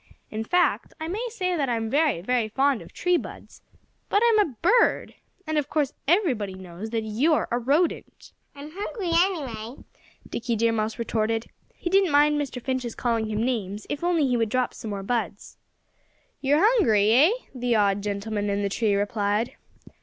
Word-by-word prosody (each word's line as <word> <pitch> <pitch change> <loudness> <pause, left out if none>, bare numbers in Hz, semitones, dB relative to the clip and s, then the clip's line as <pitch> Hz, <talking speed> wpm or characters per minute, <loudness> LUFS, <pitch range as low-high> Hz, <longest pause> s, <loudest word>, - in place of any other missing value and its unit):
"In 220 +1 -3
fact, 355 +10 +1
I 320 - -4
may 405 +8 -3
say 365 -5 -2
that 280 -5 0
I'm 225 -2 -1
very, 285 - +1
very 240 +3 0
fond 270 +1 +1
of - - -13
tree 360 -1 +1
buds. - - -9 0.5
But 410 +3 +3
I'm 445 -2 +4
a 320 - +1
bird. 455 +7 +3 0.3
And 310 -1 0
of 290 - -4
course 295 -2 0
everybody 265 - +1
knows 185 +3 -8
that 225 -1 -2
you're 255 +9 +1
a 240 - +1
rodent." 290 +8 -1 0.2
"I'm 285 +2 -9
hungry, 395 -1 -4
anyway," 275 - -1 0.4
Dickie 235 0 -2
Deer 230 +1 +2
Mouse 220 0 -2
retorted. 225 -1 -1 0.3
He 345 - -4
didn't 385 -1 +4
mind 295 0 +4
Mr. 265 -3 -5
Finch's 255 -2 -3
calling 230 -2 0
him 215 +1 -1
names, 210 -5 -3
if 290 +2 -4
only 345 -4 +2
he 250 -2 +1
would 225 -2 0
drop 255 +2 0
some 220 - -7
more 200 -1 -4
buds. 210 -3 -3 0.8
"You're 290 +5 +3
hungry, 220 - +4
eh?" 275 +9 +6 0.2
the 245 -2 0
odd 200 -1 +2
gentleman 205 +1 -3
in 200 0 -1
the 200 - 0
tree 205 0 +1
replied. 205 +2 -1
245 Hz, 175 wpm, -25 LUFS, 215-310 Hz, 0.8 s, eh